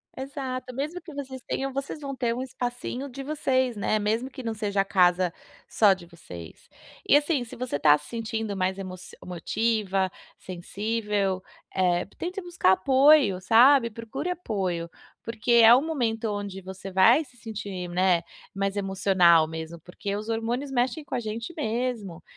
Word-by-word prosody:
Exato. 260 Hz, -2 st, -5 dB
Mesmo 305 Hz, +7 st, -4 dB
que 325 Hz, -2 st, -11 dB
vocês 265 Hz, -2 st, -7 dB
tenham, 270 Hz, 0 st, -2 dB
vocês 275 Hz, +2 st, -4 dB
vão 275 Hz, -1 st, -5 dB
ter 240 Hz, -2 st, 0 dB
um 250 Hz, -, -4 dB
espacinho 250 Hz, +1 st, -4 dB
de 270 Hz, +2 st, -7 dB
vocês, 260 Hz, -4 st, 0 dB
né. 215 Hz, +1 st, 0 dB
Mesmo 225 Hz, +5 st, -1 dB
que 260 Hz, -1 st, -9 dB
não 225 Hz, -1 st, -2 dB
seja 205 Hz, -2 st, 0 dB
a -, -, -2 dB
casa 180 Hz, -2 st, +3 dB, 0.3 s
só 205 Hz, -3 st, +5 dB
de 180 Hz, -2 st, -10 dB
vocês 90 Hz, -, -12 dB, 0.4 s
e -, -, +6 dB
assim 290 Hz, -3 st, 0 dB
se 230 Hz, -, -10 dB
você 250 Hz, -11 st, -3 dB
tá 150 Hz, 0 st, +5 dB
se 150 Hz, -, -14 dB
sentindo 220 Hz, -1 st, -3 dB
mais 190 Hz, 0 st, -1 dB
emocio 185 Hz, -1 st, -8 dB
emotiva, 195 Hz, +2 st, -1 dB, 0.3 s
sensível, 200 Hz, +1 st, -2 dB, 0.3 s
eh, 180 Hz, -1 st, +2 dB
tente 365 Hz, +3 st, -4 dB
buscar 350 Hz, -, +2 dB
apoio, 265 Hz, -1 st, +5 dB
sabe. 235 Hz, +4 st, +6 dB
Procure 230 Hz, +9 st, -5 dB
apoio, 190 Hz, -, -2 dB, 0.3 s
porque 230 Hz, +1 st, -3 dB
é 235 Hz, 0 st, +9 dB
um 275 Hz, +5 st, +2 dB
momento 235 Hz, -8 st, -1 dB
onde 205 Hz, -2 st, -4 dB
você 190 Hz, +1 st, -8 dB
vai 230 Hz, +11 st, +5 dB
se 250 Hz, -2 st, -22 dB
sentir, 205 Hz, -6 st, -6 dB
né, 180 Hz, -1 st, +2 dB, 0.3 s
mais 195 Hz, 0 st, -1 dB
emocional 190 Hz, -4 st, +4 dB
mesmo 160 Hz, +1 st, -7 dB
porque 195 Hz, +4 st, -5 dB
os 215 Hz, +2 st, -5 dB
hormônios 235 Hz, +5 st, -2 dB
mexem 260 Hz, +4 st, 0 dB
com -, -, -5 dB
a -, -, 0 dB
gente 225 Hz, +6 st, -5 dB
mesmo 230 Hz, -, -3 dB
220 Hz, 165 wpm, -26 LUFS, 190-255 Hz, 0.4 s, é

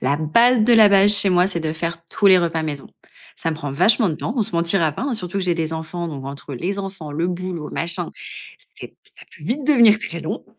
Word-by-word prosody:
la 140 Hz, -, 0 dB
base 230 Hz, +11 st, +2 dB
de 240 Hz, +2 st, +3 dB
la 220 Hz, -2 st, +7 dB
base 200 Hz, +1 st, +5 dB
chez 200 Hz, -1 st, +7 dB
moi, 180 Hz, 0 st, +3 dB
c'est 185 Hz, -3 st, -2 dB
de 155 Hz, -1 st, -3 dB
faire 170 Hz, +1 st, -4 dB
tous 205 Hz, -, 0 dB
les 190 Hz, -1 st, +6 dB
repas 165 Hz, -2 st, -2 dB
maison. 145 Hz, -3 st, -5 dB, 0.5 s
Ça 165 Hz, -, -3 dB
me -, -, -4 dB
prend 145 Hz, -3 st, -6 dB
vachement 210 Hz, -, +2 dB
de 160 Hz, -, -3 dB
temps. 215 Hz, -, -5 dB
On 235 Hz, -, +1 dB
se 195 Hz, -, -4 dB
mentira 170 Hz, -1 st, +1 dB
pas -, -, -7 dB
hein, 275 Hz, -2 st, -2 dB
surtout 195 Hz, -3 st, -4 dB
que 190 Hz, -, -2 dB
j'ai 175 Hz, -1 st, +1 dB
des 165 Hz, -1 st, -3 dB
enfants, 165 Hz, +2 st, -6 dB
donc 140 Hz, -4 st, -8 dB
entre 140 Hz, +1 st, -8 dB
les 185 Hz, +10 st, -4 dB
enfants, 195 Hz, -6 st, -7 dB
le 165 Hz, +4 st, -2 dB
boulot 180 Hz, -3 st, -5 dB
machin, 170 Hz, +1 st, -3 dB, 0.7 s
c'est -, -, -9 dB
p -, -, -33 dB
ça -, -, -15 dB
peut 150 Hz, -, -15 dB
vite 265 Hz, -, -3 dB
devenir 235 Hz, -7 st, +5 dB
très 170 Hz, -4 st, -7 dB
long. 160 Hz, -, -6 dB
175 Hz, 255 wpm, -20 LUFS, 160-200 Hz, 0.7 s, la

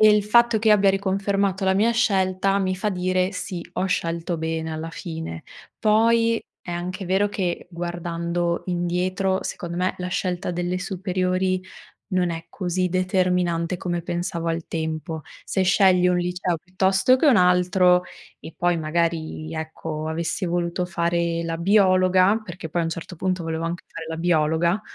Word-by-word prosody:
E 215 Hz, -, +8 dB
il 210 Hz, 0 st, +4 dB
fatto 235 Hz, +1 st, +4 dB
che 220 Hz, 0 st, +3 dB
abbia 200 Hz, -2 st, +5 dB
riconfermato 195 Hz, 0 st, 0 dB
la 190 Hz, 0 st, +3 dB
mia 215 Hz, +4 st, +3 dB
scelta 195 Hz, -3 st, +2 dB
mi 185 Hz, -1 st, 0 dB
fa 210 Hz, -, -1 dB
dire: 185 Hz, +1 st, 0 dB
"Sì, 185 Hz, -1 st, -5 dB
ho 190 Hz, -, 0 dB
scelto 170 Hz, -1 st, -1 dB
bene 160 Hz, 0 st, -3 dB
alla 160 Hz, +1 st, -5 dB
fine." 160 Hz, -, -6 dB, 0.4 s
Poi 230 Hz, +1 st, +3 dB, 0.2 s
è -, -, -8 dB
anche 180 Hz, +2 st, -4 dB
vero 190 Hz, +3 st, +2 dB
che 180 Hz, -4 st, -2 dB
guardando 170 Hz, 0 st, -2 dB
indietro 180 Hz, +2 st, 0 dB
secondo 170 Hz, 0 st, -5 dB
me 185 Hz, +1 st, 0 dB
la 180 Hz, 0 st, -3 dB
scelta 180 Hz, -1 st, -2 dB
delle 175 Hz, +1 st, -2 dB
superiori 185 Hz, -1 st, -1 dB, 0.5 s
non 180 Hz, -2 st, +1 dB
è 165 Hz, 0 st, -6 dB
così 180 Hz, -1 st, -1 dB
determinante 180 Hz, -2 st, +1 dB
come 175 Hz, -1 st, -2 dB
pensavo 175 Hz, -1 st, -3 dB
al 165 Hz, 0 st, -2 dB
tempo. 160 Hz, 0 st, -3 dB, 0.2 s
Se 190 Hz, -, -1 dB
scegli 185 Hz, -1 st, +4 dB
un 180 Hz, 0 st, +2 dB
liceo 180 Hz, 0 st, -1 dB
piuttosto 190 Hz, +8 st, +2 dB
che 290 Hz, -, +1 dB
un 270 Hz, -, +6 dB
altro 180 Hz, 0 st, +4 dB, 0.4 s
e 160 Hz, -, -10 dB
poi 175 Hz, -1 st, +2 dB
magari, 160 Hz, 0 st, -2 dB
ecco, 160 Hz, -1 st, -5 dB
avessi 170 Hz, +5 st, -2 dB
voluto 175 Hz, +1 st, -1 dB
fare 170 Hz, -1 st, 0 dB
la 165 Hz, 0 st, -3 dB
biologa, 185 Hz, +2 st, +4 dB
perché 175 Hz, -4 st, -8 dB
poi 170 Hz, +2 st, 0 dB
a -, -, 0 dB
un -, -, -1 dB
certo 170 Hz, +2 st, -6 dB
punto 185 Hz, +1 st, -1 dB
volevo 165 Hz, 0 st, -2 dB
anche 170 Hz, +1 st, -4 dB
fare 165 Hz, -, -8 dB
la 165 Hz, -, -4 dB
biologa, 165 Hz, +3 st, +2 dB
180 Hz, 160 wpm, -23 LUFS, 170-190 Hz, 0.5 s, E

